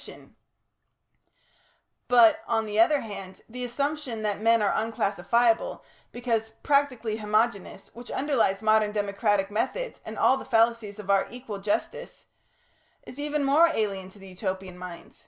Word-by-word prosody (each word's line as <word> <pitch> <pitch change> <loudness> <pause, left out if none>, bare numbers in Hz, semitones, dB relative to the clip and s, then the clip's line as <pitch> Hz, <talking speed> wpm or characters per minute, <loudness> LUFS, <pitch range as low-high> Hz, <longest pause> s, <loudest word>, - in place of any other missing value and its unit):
] - - -12 2.0
But, 235 -3 +6
on 225 -1 0
the 210 0 -2
other 280 +6 +4
hand, 195 -3 -9
the 250 +2 -7
assumption 270 -2 -3
that 210 -1 -2
men 230 0 +4
are 200 - +2
unclassifiable, 225 +1 0 0.3
because 230 -2 -2
practically 255 -6 +1
homogeneous, 210 -2 -1
which 240 +1 -11
underlies 235 -8 0
modern 215 -1 +3
democratic 205 -1 0
methods - - -3
and - - -8
all 265 - +4
the - - -7
fallacies 225 -2 +1
of 200 -2 -3
our 195 -1 +3
equal 240 -5 -7
justice, 480 - -3 0.8
is 255 - -11
even 295 0 -1
more 290 +5 +5
alien 200 - -2
to 190 - -16
the 195 -1 -12
Utopian 185 -1 -5
mind. 180 -1 -10
220 Hz, 140 wpm, -26 LUFS, 200-245 Hz, 2.0 s, But